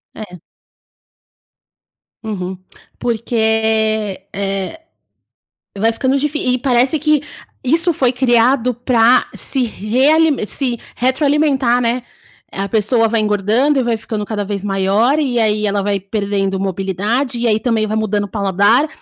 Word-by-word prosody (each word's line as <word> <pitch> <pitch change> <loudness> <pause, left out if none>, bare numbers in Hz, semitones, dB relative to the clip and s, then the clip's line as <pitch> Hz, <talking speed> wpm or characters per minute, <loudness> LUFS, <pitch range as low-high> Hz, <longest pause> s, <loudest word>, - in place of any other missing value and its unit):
É. 180 -5 -9 1.8
Uhum. 190 -4 -4 0.4
Porque, 220 -3 0
eh, 195 - -3 1.0
vai 225 +3 +2
ficando 260 +4 0
difí 295 +2 -1 0.2
e - - -1
parece 255 +4 +2
que 305 -1 +2 0.4
isso 330 +7 +2
foi 255 -4 +1
criado 250 0 +2
para 245 0 +3
se 265 -2 -3
realime 265 +6 +2
se 245 +2 -3 0.2
retroalimentar, 265 -1 +2
né. 240 +1 0 0.5
A 195 +1 -4
pessoa 225 +2 +2
vai 230 0 +1
engordando 215 +7 +1
e - - +1
vai 235 -1 0
ficando 215 -1 -5
cada 205 -1 -3
vez 200 -1 -4
maior, 205 +8 +1
e 260 -5 0
aí 215 -2 +1
ela 200 0 0
vai 200 0 0
perdendo 195 -1 -2
mobilidade, 195 +7 -2
e 240 - +1
aí 215 -1 +2
também 225 -1 0
vai 215 +1 -2
mudando 210 -1 0
o - - -5
paladar, 200 - +2
225 Hz, 135 wpm, -17 LUFS, 205-255 Hz, 1.8 s, para